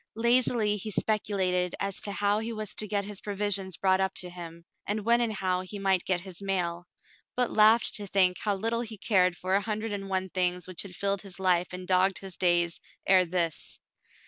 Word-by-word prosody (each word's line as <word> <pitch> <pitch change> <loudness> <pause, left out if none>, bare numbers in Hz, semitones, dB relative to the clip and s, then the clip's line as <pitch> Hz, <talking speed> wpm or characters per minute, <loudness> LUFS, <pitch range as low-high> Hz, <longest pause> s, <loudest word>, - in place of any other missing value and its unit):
Lazily 235 -2 +4
he 210 +2 -3
speculated 190 -4 0
as 200 -1 -2
to 205 - -1
how 205 +1 +1
he 225 +1 -4
was 215 -2 -4
to 215 - -3
get 200 -1 -1
his 205 -1 -4
provisions 200 -3 -1
brought 190 0 +2
up 190 0 -1
to 180 -1 -1
him, 170 -1 -10 0.2
and 210 0 -2
when 235 +1 +4
and 235 -2 0
how 185 -3 -1
he 185 +3 -7
might 195 -2 +1
get 180 -2 +1
his 185 0 -9
mail, 180 -3 -2 0.5
but 250 -1 +1
laughed 220 +2 +5
to 205 -1 -6
think 185 -1 +3
how 205 -2 0
little 230 +4 -1
he 225 -2 -7
cared 185 -3 +2
for 185 +1 -2
a 200 - +3
hundred 215 +1 -3
and 195 -1 -5
one 190 0 -1
things 180 -1 0
which 185 -3 -4
had 190 -3 -9
filled 200 0 -1
his 195 -2 -8
life 180 -2 +2
and 180 0 -7
dogged 185 0 +2
his 190 -2 -7
days 175 -1 +2 0.3
ere 185 -1 +5
this. 170 -2 -1
195 Hz, 210 wpm, -28 LUFS, 180-210 Hz, 0.5 s, laughed